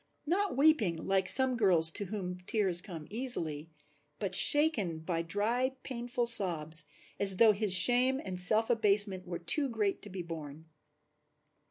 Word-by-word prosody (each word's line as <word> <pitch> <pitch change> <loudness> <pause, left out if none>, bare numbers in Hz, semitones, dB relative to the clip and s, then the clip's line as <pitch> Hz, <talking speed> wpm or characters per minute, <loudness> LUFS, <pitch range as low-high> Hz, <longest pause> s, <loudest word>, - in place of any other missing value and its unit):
Not 370 -1 -4
weeping 275 - 0
like 190 +2 -2
some 260 +5 +4
girls 175 -8 +2
to 205 - -6
whom 180 -2 -8
tears 195 -6 -2
come 170 -6 -12
easily, 165 - -4 0.5
but 195 +2 -7
shaken 220 - +2
by 165 0 -5
dry 230 +9 -4
painful 240 -1 -6
sobs, 165 -8 +4 0.3
as 195 -2 +5
though 225 +1 +3
his 205 -2 +1
shame 250 +7 +3
and 185 -1 -7
self 215 +6 +5
abasement 205 -4 -1
were 175 -1 -7
too 275 - -4
great 210 -4 -5
to 205 - -11
be 185 -2 -9
borne. 160 -2 -12
200 Hz, 150 wpm, -28 LUFS, 175-240 Hz, 0.5 s, as